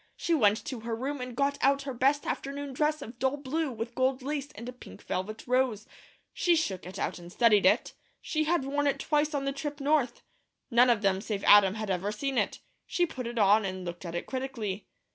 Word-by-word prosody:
She 340 - -1
went 215 -8 +3
to 255 - -4
her 230 +1 -3
room 270 +4 -3
and 250 -1 -6
got 280 0 +1
out 275 0 +3
her 275 -1 -4
best 275 +4 +2
afternoon 280 0 -4
dress 300 +3 0
of 235 +2 -11
dull 265 +2 +1
blue 290 +2 -2
with 230 +1 -5
gold 260 +1 0
lace 285 0 -3
and 230 +4 -8
a 250 - -6
pink 250 - -13
velvet 215 +4 -4
rose. 250 -4 +1 0.5
She 350 -1 +3
shook 195 - -2
it 185 - -8
out - - -2
and 175 0 -11
studied 210 -3 +4
it. 210 +6 +2 0.3
She 310 -1 -1
had 330 -3 +1
worn 290 +1 0
it 280 - +1
twice 300 0 +1
on 275 -1 -1
the 275 - -1
trip 290 +1 -5
North. 280 -4 +1 0.5
None 245 +2 +6
of 225 -3 +2
them 195 -1 +2
save 205 -2 -4
Adam 205 -1 +7
ever 195 -5 -2
had 210 - -2
seen 275 -2 0
it. - - -2 0.3
She 350 - +1
put 260 -7 -6
it 240 0 -6
on, 210 0 +5
and 185 -1 -4
looked 175 +1 -6
at 170 -1 -6
it 175 - -3
critically. 235 -7 -4
255 Hz, 225 wpm, -29 LUFS, 210-285 Hz, 0.5 s, Adam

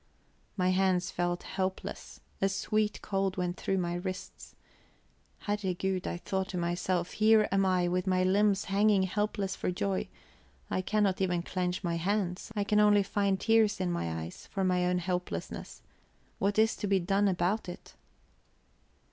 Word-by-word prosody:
My 185 -1 +2
hands 185 0 +2
felt 175 0 -1
helpless; 190 0 -4 0.2
a 195 - +3
sweet 210 +2 -1
cold 195 -1 -1
went 180 -1 -1
through 195 - -1
my 175 -2 -1
wrists. 185 +1 -6 0.9
Herregud! 190 -2 -1
I - - -2
thought 190 +2 -2
to 185 - -4
myself, 175 +1 -1
here 215 0 +4
am 195 0 +3
I 180 -1 +2
with 180 +1 -1
my 185 -1 +2
limbs 195 +1 +3
hanging 200 0 +3
helpless 200 0 -1
for - - -2
joy; 190 +1 -1 0.6
I 185 - +1
cannot 200 -1 +1
even 180 -2 +1
clench 180 +1 -2
my 170 -2 -1
hands; 185 +2 -1
I 205 - +1
can 210 +1 +2
only 205 -1 +5
find 200 -1 0
tears 225 -3 +3
in 185 -2 0
my 80 - -2
eyes 85 - -10
for 195 - -2
my 180 -1 +2
own 180 0 +1
helplessness. 180 0 -4 0.6
What 200 +1 +1
is 220 +1 +4
to 205 - -3
be 195 -1 +3
done 195 +3 +2
about 185 +2 0
it? 175 - -10
190 Hz, 160 wpm, -30 LUFS, 180-200 Hz, 0.9 s, only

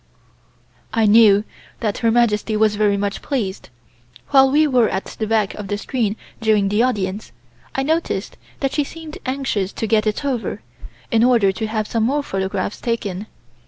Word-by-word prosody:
I 225 -1 +3
knew 210 -1 +6 0.4
that 215 -3 -2
Her 230 - +2
Majesty 220 -2 +2
was 215 -1 +3
very 205 -1 +2
much 200 0 -2
pleased. 210 - -3 0.6
While 270 -1 +6
we 300 +3 +4
were 250 -6 +3
at 190 - -3
the 220 - -5
back 215 -2 +1
of 205 -2 -7
the 205 - -2
screen 220 -2 -1 0.3
during 215 -3 +2
the 210 +3 +2
audience, 205 -5 -1 0.4
I 270 - 0
noticed 320 +4 -1 0.3
that 270 -2 0
she 295 - +1
seemed 315 +1 -9
anxious 255 -8 -1
to - - -3
get 215 0 +2
it 215 +7 -1
over, 255 -5 -2 0.5
in 230 -1 +4
order 235 -6 +4
to 220 +3 -4
have 215 0 -2
some 230 - -1
more 285 +4 0
photographs 195 -2 -3
taken. 210 -4 -3
220 Hz, 170 wpm, -20 LUFS, 205-255 Hz, 0.6 s, knew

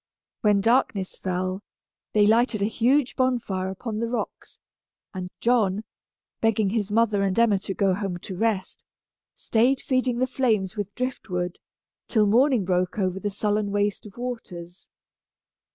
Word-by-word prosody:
When 210 -3 +3
darkness 225 -4 +1
fell, 185 +1 -2 0.5
they 210 -1 +5
lighted 220 -1 +3
a - - +3
huge 245 +5 +2
bonfire 235 -8 0
upon 215 +3 -5
the 230 - -1
rocks, 245 - -5 0.6
and 185 -2 -5
John, 220 -4 +2 0.6
begging 220 -3 +2
his 210 -2 -1
mother 215 -2 +2
and 195 0 0
Emma 225 -4 +4
to 195 0 -5
go 195 -2 +2
home 190 -2 -3
to 185 +2 -8
rest, 210 -1 -1 0.5
stayed 245 +4 +2
feeding 255 -2 0
the 255 - +2
flames 225 -7 0
with 205 -2 -5
drift 255 -3 -4
wood, 180 -1 -2 0.5
till 215 -3 +3
morning 240 0 +3
broke 180 +1 0
over 190 -2 0
the 205 - -2
sullen 205 +1 -1
waste 205 +1 -1
of 200 - -15
waters. 190 -8 -7
210 Hz, 150 wpm, -25 LUFS, 190-235 Hz, 0.6 s, they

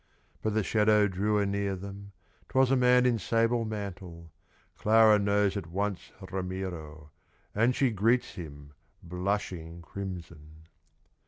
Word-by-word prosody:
But 110 -1 -1
the 110 - +2
shadow 105 0 +3
drew 100 +3 0
anear 100 -1 0
them, 100 +1 -9 0.4
'Twas 130 0 +3
a - - +5
man 125 0 +4
in 120 -3 +2
sable 115 +3 +1
mantle. 95 -6 -7 0.4
Clara 110 -1 +5
knows 100 0 +2
at 100 -5 -4
once 100 +2 -3 0.2
Ramiro, 90 -6 -5 0.4
And 115 +4 +2
she 135 -3 +2
greets 115 +3 +1
him, 70 -6 -10 0.3
blushing 90 -2 -3
crimson. 80 -4 -8
100 Hz, 120 wpm, -29 LUFS, 90-110 Hz, 0.4 s, a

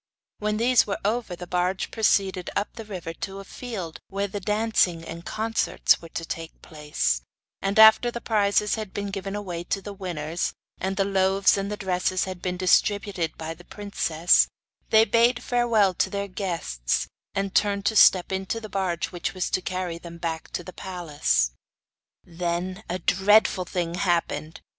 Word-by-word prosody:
When 210 0 -1
these 240 +1 +4
were 200 - -1
over 220 -3 -1
the 180 - -8
barge 180 +1 -1
proceeded 195 -4 +1
up 205 - -1
the 225 - -8
river 180 -5 -6
to 195 +3 -6
the 195 - -8
field 200 -9 -6
where 200 +1 -2
the 205 +1 -5
dancing 210 -4 +1
and 165 +1 -8
concerts 225 +3 +1
were 165 - -11
to 165 - -5
take 165 0 -6
place, 150 - -1 0.4
and 195 +1 -1
after 220 +2 +8
the 235 - -5
prizes 210 -2 +2
had 215 -3 -4
been 205 -1 -3
given 195 0 -4
away 180 -5 -4
to 195 - -1
the 205 +1 -8
winners, 170 -4 -3 0.3
and 190 +1 -2
the 195 - +2
loaves 195 0 +3
and 200 0 -3
the 210 - -3
dresses 185 -1 0
had 185 -2 -6
been 180 -1 -2
distributed 190 -2 +1
by 160 0 -5
the 175 - -16
princess, 175 -5 +2 0.4
they 220 0 +6
bade 235 +2 +3
farewell 235 -6 +3
to - - 0
their 200 -1 -3
guests, 170 - -2 0.3
and 195 0 -1
turned 200 -1 +1
to 220 - +1
step 185 -3 +6
into 190 +4 -2
the 215 -1 -9
barge 185 -3 -2
which 175 +1 -4
was 185 - -2
to 185 - +1
carry 180 -2 -3
them 170 0 -10
back 165 -1 -4
to 175 - -3
the 185 - -10
palace. 145 - 0 0.7
Then 175 +3 -3
a 180 - -1
dreadful 190 +1 +3
thing 170 -1 -2
happened. 175 -3 -1
190 Hz, 175 wpm, -25 LUFS, 175-205 Hz, 0.7 s, after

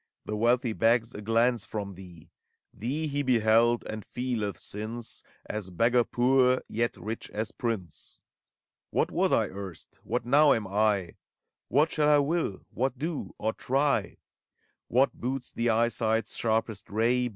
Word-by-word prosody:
The 105 - -3
wealthy 120 +2 +2
begs 115 +1 +2
a 105 - -7
glance 115 +3 +2
from 100 -2 -5
thee: 85 -3 -13 0.4
Thee 135 +9 -2
he 145 -1 -1
beheld, 120 -2 +3
and 110 -1 -5
feeleth, 120 -5 -3
since. 110 +3 -5 0.2
As 105 -3 -4
beggar 120 +7 +3
poor, 130 +1 +3
yet 115 +1 -1
rich 110 +2 -5
as 110 +1 -3
prince. 105 -9 -5 0.7
What - - 0
was - - +1
I - - +3
erst? 95 -3 -8
What - - -2
now 145 +4 +6
am 110 - -1
I? 100 -2 0 0.5
What 150 +6 +3
shall 150 -1 +2
I 150 - +6
will? 145 - -1
— - - -46
what 130 0 0
do, 155 +2 -4
or 110 +1 -1
try? 140 +2 0 0.7
What 130 +3 +3
boots 125 0 -4
the 120 0 0
eyesight's 115 0 +1
sharpest 110 -2 -1
ray? 120 +4 +1
115 Hz, 150 wpm, -28 LUFS, 110-125 Hz, 0.7 s, now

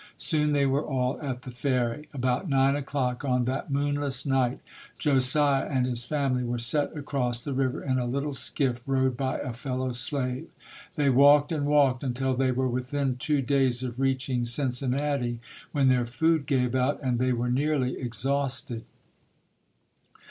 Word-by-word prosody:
Soon 150 -2 0
they 140 -1 +3
were 135 +1 +1
all 130 -2 -2
at 130 -4 -4
the 130 - -8
ferry. 130 +2 -2
About 130 +5 -1
nine 135 0 +3
o'clock 135 -3 -2
on 125 -3 +1
that 130 +4 -3
moonless 145 -1 -1
night, 130 -2 +1 0.4
Josiah 140 0 +3
and 130 -3 +1
his 120 -1 +1
family 135 -3 0
were 120 0 -2
set 145 +6 0
across 130 -4 -1
the 140 +3 -5
river 130 -1 -1
in 130 -2 0
a 125 - -2
little 140 +4 -2
skiff 130 -2 -1
rowed 130 -1 +1
by 130 +1 -2
a 125 - -5
fellow 130 +1 -3
slave. 130 +3 -1 0.5
They 145 -4 +2
walked 145 +3 +5
and 145 -3 -1
walked 140 -4 +3
until 130 0 -1
they 130 0 +1
were 130 +1 0
within 130 +1 -2
two 150 0 0
days 130 -1 +1
of 125 -1 -5
reaching 130 -2 0
Cincinnati, 125 0 0 0.3
when 140 -2 +2
their 125 -2 +3
food 150 +4 +1
gave 125 -4 +1
out 130 +2 +1
and 125 -2 0
they 130 0 +1
were 120 0 -1
nearly 135 -1 0
exhausted. 130 -1 -2
130 Hz, 165 wpm, -27 LUFS, 125-140 Hz, 0.5 s, walked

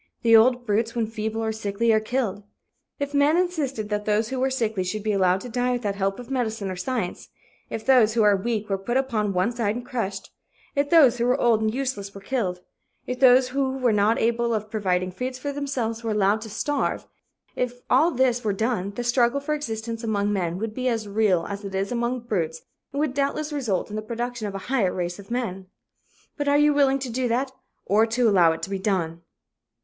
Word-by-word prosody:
The 230 -1 +6
old 245 +2 +5
brutes, 225 +2 0
when 230 -2 +1
feeble 220 0 -3
or 220 - 0
sickly, 220 +1 0
are 215 - +4
killed. 215 -3 -2 0.6
If 285 0 -3
men 285 +3 +4
insisted 290 -12 -1
that 210 0 -2
those 215 +1 +1
who 265 - -3
were 265 +1 +2
sickly 225 -7 -1
should 200 +3 -3
be 215 - 0
allowed 190 -1 +2
to - - -7
die 245 +1 0
without 225 -5 -1
help 195 0 -1
of 245 +1 -9
medicine 220 -6 -2
or - - -4
science, 210 0 -3 0.4
if 220 - -5
those 240 -5 +5
who 225 - +4
are 205 -1 +5
weak 215 +1 -2
were 195 -1 -1
put 240 +6 -1
upon 225 -6 0
one 185 +4 +1
side 225 -3 -1
and 245 0 -6
crushed, 205 -6 -4 0.4
if 285 0 +1
those 275 -8 +6
who 235 - +2
were 250 - +2
old 230 -2 +3
and 220 0 +1
useless 235 -6 -3
were - - -7
killed, 195 -6 -2 0.4
if 250 0 -4
those 255 -1 +6
who 265 0 -1
were 250 -4 +2
not 210 +2 +3
capable 235 0 +1
of 215 0 -4
providing 185 -4 0
food 255 +6 -4
for 285 +3 -4
themselves 255 -5 -3
were 225 - -2
allowed 210 0 +2
to 220 - -7
starve, 290 +7 -1 0.5
if 245 0 -3
all 330 - +4
this 250 -4 +1
were 210 -2 0
done, 215 -2 -1
the 245 - -3
struggle 240 +2 +2
for 285 +2 -2
existence 230 -5 -4
among 205 -2 0
men 175 -3 -1
would 215 +2 -4
be 255 +2 -2
as 225 -3 -1
real 200 -4 +2
as 200 0 -6
it 195 -1 -5
is 195 +3 -1
among 240 +1 -1
brutes 165 -9 -2 0.3
and 280 - -3
would 300 -4 0
doubtless 285 +2 -1
result 225 -9 -1
in - - -5
the 215 - -2
production 235 0 -4
of 200 - -6
a 195 - -6
higher 235 -9 +1
race 175 +1 -3
of 200 - -12
men. 215 -6 -3 0.7
"But 290 -1 -2
are 285 0 +4
you 295 0 +4
willing 275 -2 +3
to 265 -2 -5
do 250 +2 0
that 255 +3 0 0.3
or 215 +3 +3
to 235 +1 +2
allow 180 -6 +5
it 160 - -5
to - - -3
be 195 - -2
done?" 175 -5 -1
225 Hz, 225 wpm, -24 LUFS, 205-255 Hz, 0.7 s, The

